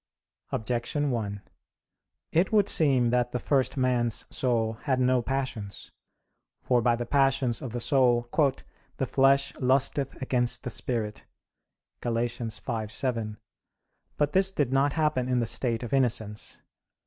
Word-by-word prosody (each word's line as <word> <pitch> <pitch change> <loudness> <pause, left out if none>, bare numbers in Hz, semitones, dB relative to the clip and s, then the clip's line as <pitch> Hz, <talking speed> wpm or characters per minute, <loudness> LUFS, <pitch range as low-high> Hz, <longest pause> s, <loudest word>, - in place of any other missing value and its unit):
Objection 125 +5 -1
1: 100 -4 -3 0.9
It 170 +4 +2
would 205 -2 +4
seem 135 -10 +3
that 125 0 +1
the - - -1
first 135 +1 0
man's 125 -3 +1
soul 115 -3 0
had 130 -1 +2
no 130 0 +3
passions. 120 -6 -4 0.7
For 125 -2 +2
by 120 +1 +3
the 120 0 -4
passions 135 -2 +1
of 130 - -5
the 120 - -3
soul 120 -2 +2 0.7
"the 135 - 0
flesh 140 +2 +3
lusteth 135 +1 0
against 125 -2 0
the 125 - -4
spirit" 110 -4 -3 0.8
(Gal. 120 - -2
5:7). 115 -1 -2 0.8
But 145 0 +1
this 190 +2 +4
did 145 -9 -1
not 140 +1 +2
happen 150 -5 0
in 125 -1 +2
the 120 - 0
state 115 0 0
of 120 - -5
innocence. 115 -5 -1
125 Hz, 135 wpm, -27 LUFS, 115-135 Hz, 0.9 s, would